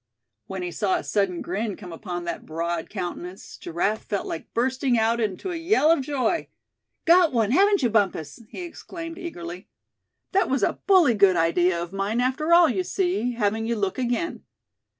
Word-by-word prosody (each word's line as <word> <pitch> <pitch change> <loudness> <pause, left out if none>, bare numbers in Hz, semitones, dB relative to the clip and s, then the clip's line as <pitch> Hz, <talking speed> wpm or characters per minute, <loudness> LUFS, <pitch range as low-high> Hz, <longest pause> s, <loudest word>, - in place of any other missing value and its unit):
When 190 -1 -5
he 175 - -3
saw 195 +1 0
a - - -2
sudden 195 -4 0
grin 205 +3 -2
come 180 -4 -9
upon 175 0 -5
that 170 - -4
broad 165 +1 -3
countenance 180 -1 -6
Giraffe 185 +6 -2
felt 200 -2 -2
like 160 - -6
bursting 255 +1 +1
out 225 +1 +2
into 220 - -2
a - - -3
yell 330 -1 +3
of 330 - +3
joy. 275 +3 -1 0.6
"Got 345 -1 +6
one, 225 -3 +2
haven't 400 +3 +4
you 240 - +3
Bumpus?" 195 -7 0
he - - -7
exclaimed, 335 0 -8
eagerly. 180 - -7 0.6
"That 390 0 +2
was 270 0 +1
a - - 0
bully 360 - +6
good 200 -3 +5
idea 170 +1 +2
of 170 +2 -6
mine 200 +4 -1
after 260 +6 0
all, 340 0 +8
you 340 +7 0
see, 355 -10 -1
having 225 0 0
you 235 - 0
look 200 +2 -2
again. 255 +7 -1
225 Hz, 180 wpm, -25 LUFS, -, 0.6 s, all